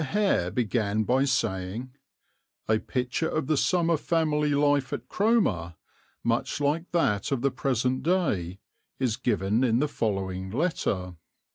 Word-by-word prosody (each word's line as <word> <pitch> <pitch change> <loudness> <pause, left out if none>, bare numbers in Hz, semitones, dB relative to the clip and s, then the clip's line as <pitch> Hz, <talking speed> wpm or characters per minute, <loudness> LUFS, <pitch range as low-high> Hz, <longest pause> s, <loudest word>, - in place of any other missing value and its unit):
Hare 195 - +1
began 110 -2 0
by 130 +5 +2
saying, 115 -2 -2 0.8
"A 110 0 +3
picture 125 +7 -2
of 155 - -1
the 155 +3 +1
summer 170 +2 +2
family 150 -2 +1
life 145 -2 +2
at - - -5
Cromer, 150 - +1 0.5
much 115 +3 0
like 150 +4 0
that 110 - +1
of 135 -3 -1
the 140 - +2
present 130 0 0
day, 130 - 0 0.4
is 125 -5 0
given 105 +1 0
in 115 -3 +3
the 150 +4 +2
following 95 -7 -2
letter." 95 - -1
130 Hz, 135 wpm, -27 LUFS, 105-150 Hz, 0.8 s, A